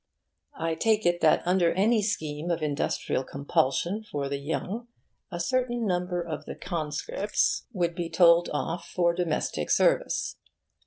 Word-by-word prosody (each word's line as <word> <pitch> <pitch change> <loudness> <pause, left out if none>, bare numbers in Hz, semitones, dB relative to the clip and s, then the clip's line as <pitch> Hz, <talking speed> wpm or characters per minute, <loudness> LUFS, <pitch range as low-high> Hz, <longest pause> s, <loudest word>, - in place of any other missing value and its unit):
I 165 0 -1
take 220 +4 +1
it 175 0 +2
that - - +4
under 180 -1 +3
any 215 +4 +3
scheme 160 -6 -2
of 170 -2 -1
industrial 145 -2 -1
compulsion 140 +8 0
for 145 -9 -4
the 140 0 -2
young 190 +10 -4 0.4
a 175 -2 -5
certain 240 +3 0
number 180 -2 -1
of 160 -3 -6
the - - -6
conscripts 170 +4 -1
would 175 -6 0
be 170 -1 -4
told 170 -1 +5
off 165 +3 -3
for 170 -1 +2
domestic 170 -3 -1
service. - - +2
175 Hz, 145 wpm, -27 LUFS, 160-200 Hz, 0.4 s, told